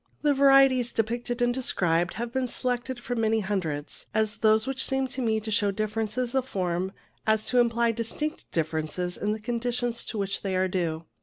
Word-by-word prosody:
The 295 -1 +4
varieties 270 -3 +5
depicted 240 +2 -1
and 240 0 +2
described 175 -9 +1
have 235 +1 -4
been 260 -1 0
selected 245 +1 -2
from 240 -1 -2
many 220 0 +2
hundreds, 170 -8 -3
as 215 -1 +1
those 220 0 +4
which 265 0 0
seem 265 0 0
to 265 0 -4
me 220 -2 +1
to 220 0 -6
show 205 0 +2
such 200 - -1
differences 220 +4 -2
of 265 -1 0
form 185 0 -1 0.4
as 220 0 +2
to 250 - +3
imply 235 -1 +3
distinct 235 +7 -4
differences 160 +2 -2
in 210 - -1
the 220 - -5
conditions 240 +1 -1
to 225 - -4
which 200 -1 -2
they 190 -2 -2
are 185 0 +2
due. 170 -3 -2
225 Hz, 190 wpm, -27 LUFS, 195-245 Hz, 0.4 s, varieties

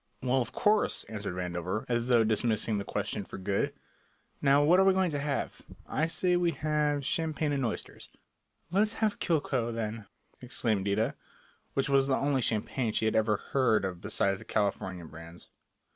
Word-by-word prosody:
"Well, 130 +1 +2
of 120 +1 -4
course," 210 +8 +2
answered 105 -4 -5
Vandover, 90 +3 -3
as 120 0 0
though 120 -2 +5
dismissing 110 -1 +1
the - - -3
question 105 0 -3
for - - -9
good. 100 +1 -1 0.7
"Now, 140 +1 +5
what 175 +5 +5
are - - +6
we 190 0 +5
going 190 -3 +2
to 145 - -2
have? 140 0 -3 0.2
I 155 - 0
say 180 +2 +1
we 175 -1 +2
have 150 -2 0
champagne 155 -1 0
and 135 -1 0
oysters." 115 - -5 0.6
"Let's 210 +4 +2
have 215 -2 0
Cliquot, 130 -8 0
then," 110 -2 -4 0.3
exclaimed 110 -5 0
Ida, 100 - +1 0.6
which 135 - +1
was 135 -1 +3
the 135 - +2
only 140 -1 +1
champagne 115 +1 0
she 110 - 0
had 110 - +1
ever 110 -1 +3
heard 120 -8 +3
of 90 -2 -5
besides 95 -1 0
the - - -12
California 95 -4 -1
brands. 80 +2 -12
120 Hz, 175 wpm, -30 LUFS, 105-145 Hz, 0.7 s, are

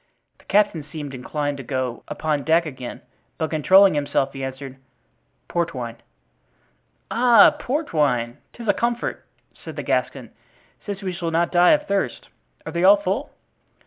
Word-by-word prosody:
The - - -23
captain 200 -5 +2
seemed 145 -1 -8
inclined 145 +3 -3
to 135 - -7
go 130 -1 -3
upon 150 0 -2
deck 165 +1 +3
again, 130 -5 -7 0.4
but 160 - -2
controlling 190 +5 +5
himself 140 -2 0
he 135 - -6
answered: 135 0 -7 0.7
"Port 170 -4 -2
wine." 120 -2 -5 1.1
"Ah! 240 0 +6
port 295 +4 -3
wine! 125 -6 0
'tis 235 -1 -10
a 205 - +4
comfort," 240 +3 -2 0.3
said - - -11
the - - -5
Gascon, - - -2 0.5
"since 200 -1 -6
we 185 - -2
shall 170 -1 -3
not 165 +1 +1
die 175 - +6
of 300 0 +1
thirst. 195 -11 -2 0.4
Are 160 - -5
they 170 +2 -1
all 200 +2 +8
full?" 200 +8 -3
160 Hz, 155 wpm, -22 LUFS, 135-200 Hz, 1.1 s, all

